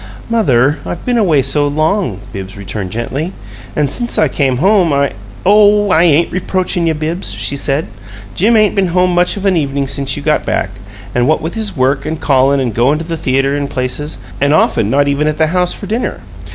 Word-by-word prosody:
"Mother, 145 - +2
I've 175 - -6
been 245 -2 +1
away 160 -10 +3
so 145 +2 +1
long," 155 - 0
Bibbs 95 0 -7
returned, 100 -1 -5
gently. 130 - -4 0.4
"And 150 -1 +1
since 235 - -3
I - - +3
came 135 -4 0
home 185 - +3
I 140 -1 +1 0.2
" 100 +1 -19
"Oh, 205 0 +5
I 160 - +4
ain't 170 -1 +3
reproachin' 185 -1 -1
you, 160 - +1
Bibbs," 160 +4 -3
she 140 - -3
said. 140 +2 -1 0.5
"Jim 220 - +3
ain't 215 -2 +3
been 195 -2 +1
home 180 0 +3
much 175 +3 +1
of 200 - -5
an 195 -2 +3
evening 140 -3 -1
since 135 0 -2
you 145 - -6
got 150 0 +1
back - - -1 0.4
what 125 +6 +2
with 160 +2 -5
his 210 -6 -4
work 135 +2 +1
and 160 0 -3
callin' 135 0 +2
and 125 -4 -1
goin' 125 +7 +2
to 160 - -5
the 165 0 -3
theater 135 -3 0
and 140 -1 -2
places, 130 +4 -3 0.2
and 140 +2 +3
often 115 -8 +2
not 140 +3 +2
even 140 +2 +1
at 155 0 -1
the 160 - +3
house 180 -1 +1
for - - -8
dinner. 225 +5 -3
150 Hz, 210 wpm, -14 LUFS, 135-180 Hz, 0.5 s, Oh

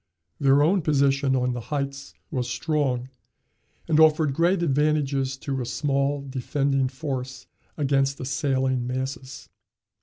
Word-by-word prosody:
Their 140 0 +4
own 185 +5 +3
position 140 -3 +2
on 125 -1 0
the 120 - -4
heights 140 -1 -4 0.2
was 125 -5 -2
strong 135 -4 -1 0.8
and 155 -1 +3
offered 155 -2 +4
great 170 +4 +2
advantages 140 -3 +1
to 135 -1 -3
a - - -3
small 140 +3 -1
defending 135 +1 0
force 130 -2 -5 0.3
against 135 -2 +1
assailing 130 -3 0
masses. 130 +1 -5
140 Hz, 120 wpm, -25 LUFS, 130-150 Hz, 0.8 s, Their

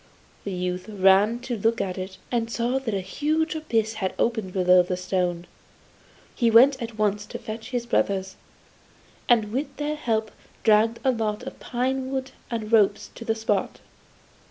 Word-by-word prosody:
The 200 - -3
youth 180 +2 -3
ran 200 +3 +4
to 250 -1 -3
look 225 +2 +1
at 190 -2 -2
it, 190 0 -6
and 230 -2 0
saw 240 +3 0
that 245 -5 -4
a 195 - -1
huge 305 - -1
abyss 225 -8 -1
had 190 - -1
opened 220 -5 0
below 180 -1 +5
the 180 +1 -2
stone. 180 -1 -1 0.9
He 235 -3 +2
went 255 +4 +6
at 230 -1 -6
once 210 -1 +1
to - - -6
fetch 220 +1 -7
his 245 -2 -2
brothers, 190 -4 0 0.9
and 220 -4 +4
with 270 +6 -3
their 295 +1 -2
help 220 -6 -1 0.3
dragged 220 +1 +4
a 265 - +4
lot 220 -1 -2
of 265 - -8
pine 260 +1 -2
wood 265 0 -3 0.2
and 225 -2 -4
ropes 210 -2 +3
to - - -9
the 225 -1 0
spot. 215 -3 -1
220 Hz, 170 wpm, -25 LUFS, 195-245 Hz, 0.9 s, went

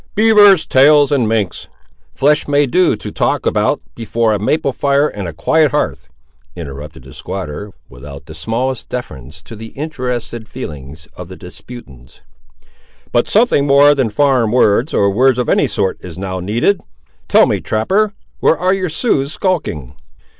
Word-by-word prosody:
"Beavers' 210 -4 +5
tails 145 +1 +4
and 125 -6 +1
minks' 105 -6 -2 0.5
flesh 150 +3 +2
may 145 0 +2
do 175 +2 +2
to 105 - -8
talk - - -1
about - - 0
before 115 0 -1
a 105 - -1
maple 140 +6 0
fire 140 +2 +1
and 100 -8 -6
a - - -5
quiet 150 - +2
hearth," 150 - -3 0.5
interrupted 70 -5 -9
the 65 - -14
squatter, 95 +2 -7 0.2
without 70 +2 -12
the 80 - -11
smallest 115 +10 -3
deference 80 - -8
to 115 - -11
the 110 +1 -9
interested 125 -6 -5
feelings 75 - -9
of 90 - -9
the 95 - -10
disputants; 90 - -13 0.9
"but 120 - +1
something 210 - +2
more 140 +1 +6
than 135 -5 0
foreign 130 -1 +2
words, 120 +4 +2
or 100 0 +2
words 130 +4 +2
of 125 - -1
any 145 - +2
sort, 100 -4 -2
is 90 -2 -9
now 95 -1 -4
needed. 115 - 0 0.5
Tell - - +5
me, - - -1
trapper, 200 - 0 0.2
where 160 - +2
are 185 +3 +1
your 185 -2 -2
Siouxes 150 - -1
skulking?" 145 - -3
120 Hz, 160 wpm, -16 LUFS, 95-145 Hz, 0.9 s, more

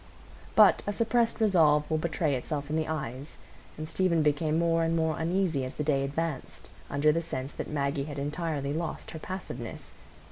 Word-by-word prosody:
But - - +7
a 205 - 0
suppressed 230 +1 +1
resolve 160 -8 +4
will 155 - +2
betray 155 -2 0
itself 145 +3 -3
in - - 0
the 160 -1 0
eyes, 140 -2 -5 0.4
and 155 +1 -5
Stephen 170 -2 +1
became 150 +1 +1
more 165 0 +2
and 165 0 +1
more 160 -1 0
uneasy 165 -4 +1
as 130 - -5
the 150 - -2
day 140 -2 +1
advanced, 145 0 -4 0.2
under 145 +2 +3
the 165 +2 0
sense 140 -4 -4
that - - -6
Maggie 140 -1 -1
had 145 -1 -7
entirely 145 -1 -2
lost 165 +1 -4
her 160 - -7
passiveness. 140 - -6
155 Hz, 180 wpm, -29 LUFS, 145-165 Hz, 0.4 s, But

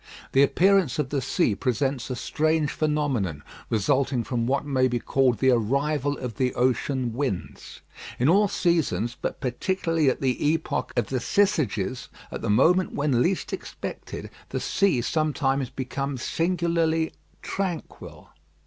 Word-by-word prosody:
The 135 - +4
appearance 185 0 +3
of 150 -4 -1
the 140 -1 -1
sea 125 -4 +1
presents 130 +3 -1
a 125 - -2
strange 155 +3 0
phenomenon, 135 - -1 0.3
resulting 130 +3 +1
from 115 0 -2
what 140 +2 0
may 130 -3 +2
be 120 -1 -1
called 125 0 +1
the 130 +5 +4
arrival 140 +5 +1
of 120 -5 -6
the 130 -1 0
ocean 125 0 0
winds. 125 -7 -4 0.4
In 125 - +2
all 200 +6 +5
seasons, 155 - 0
but - - -3
particularly 165 +3 0
at 130 - -1
the 130 -2 0
epoch 165 - -2
of 120 -4 +1
the 130 - 0
Syzygies, 130 - 0 0.2
at - - -5
the - - -2
moment 175 - +3
when 140 -4 +1
least 185 +7 0
expected, - - -6 0.2
the - - -2
sea 195 -11 +1
sometimes 140 -3 0
becomes 135 0 -4
singularly 165 -2 0 0.3
tranquil. 185 -4 -5
135 Hz, 140 wpm, -25 LUFS, 125-160 Hz, 0.4 s, all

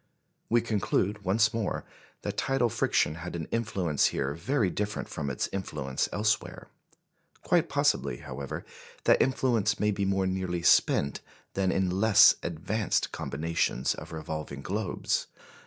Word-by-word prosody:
We 120 +1 +4
conclude 105 -2 0
once 110 +4 +3
more 115 -3 -2 0.4
that - - -3
tidal 135 -3 +1
friction 75 - +1
had 90 +1 -6
an 80 -2 -3
influence 95 -9 +1
here 70 +1 -1
very 100 - 0
different 105 +2 -3
from 75 -3 -4
its 65 - -1
influence 75 -9 -2
elsewhere. 105 +1 -1 0.7
Quite - - +2
possibly, - - +1
however, 70 +2 -6 0.4
that - - +4
influence 120 -5 +1
may 105 0 +2
be 100 -1 -1
more 95 0 +1
nearly 95 -2 -2
spent 70 -4 +3 0.3
than 95 -1 +1
in 95 -1 +1
less 110 -2 +8
advanced 85 +5 -1
combinations 75 -3 -1
of - - -10
revolving 80 -3 -5
globes. 100 0 -1
95 Hz, 135 wpm, -28 LUFS, 80-105 Hz, 0.7 s, less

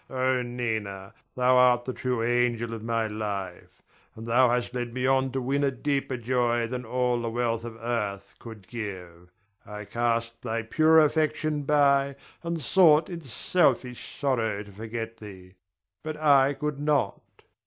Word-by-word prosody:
Oh, 130 -1 0
Nina, 110 -6 -4 0.2
thou 125 0 +4
art 125 -1 +4
the 130 - -3
true 125 -3 -2
angel 120 -1 0
of 115 - -6
my 115 0 -1
life; 105 -4 -6 0.3
and 110 - -9
thou 120 +2 +4
hast 125 0 -1
led 120 -1 -4
me 130 0 -1
on 135 0 +2
to 135 - -2
win 135 +3 0
a 140 - +3
deeper 135 0 -2
joy 120 0 0
than 125 +1 -5
all 125 0 0
the 115 - -2
wealth 115 -1 -1
of 115 -1 -7
earth 105 -4 -3
could 110 -5 -11
give. 90 -6 -7 0.3
I 105 0 -8
cast 115 0 -1
thy 115 -1 -3
pure 155 +7 +4
affection 155 -1 +1
by, 140 -1 +3 0.3
and 170 -1 -3
sought 155 +1 +4
in 170 -1 -6
selfish 130 -2 -1
sorrow 115 -7 0
to 100 - -14
forget 115 +2 -6
thee; 95 -3 -12 0.5
but 155 -1 -5
I 140 -2 +4
could 145 +1 -4
not. 145 0 0
120 Hz, 160 wpm, -26 LUFS, 115-135 Hz, 0.5 s, thou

